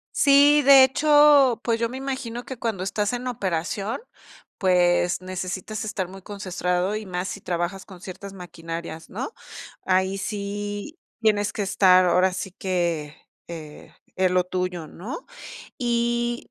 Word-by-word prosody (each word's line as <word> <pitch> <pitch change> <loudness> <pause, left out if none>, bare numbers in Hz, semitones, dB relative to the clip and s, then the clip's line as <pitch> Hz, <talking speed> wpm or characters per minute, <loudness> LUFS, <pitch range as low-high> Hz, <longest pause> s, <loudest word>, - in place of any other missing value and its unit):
Sí, 285 +1 +6
de 275 -1 +9
hecho, 290 -2 +5
pues, 230 -1 0
yo 230 - +1
me 250 +3 -7
imagino 260 -3 -4
que 260 - -8
cuando 225 -6 -2
estás 205 +3 -1
en 245 +1 -3
operación, 195 -1 -2 0.6
pues, 180 -2 +2
necesitas 185 +3 -5
estar 210 -4 -3
muy 190 +1 -11
concentrado, 185 -1 -2
y 215 0 -5
más 180 0 -3
si 200 - -6
trabajas 180 +2 -3
con 185 -3 -13
ciertas 190 +1 -9
maquinarias, 165 -3 -7
¿no? 255 - -5 0.5
Ahí 190 +1 +1
sí 205 - -5 0.2
tienes 210 -2 +2
que - - -3
estar, 190 -2 +5
ahora 180 +1 +3
sí 185 +1 -5
que, 170 -5 -2 0.3
eh, 155 -3 -10 0.2
en 185 -1 +2
lo 180 0 +3
tuyo, 180 -2 -3
¿no? 220 - -8 0.5
Y 240 -1 -1
195 Hz, 140 wpm, -24 LUFS, 180-235 Hz, 0.6 s, de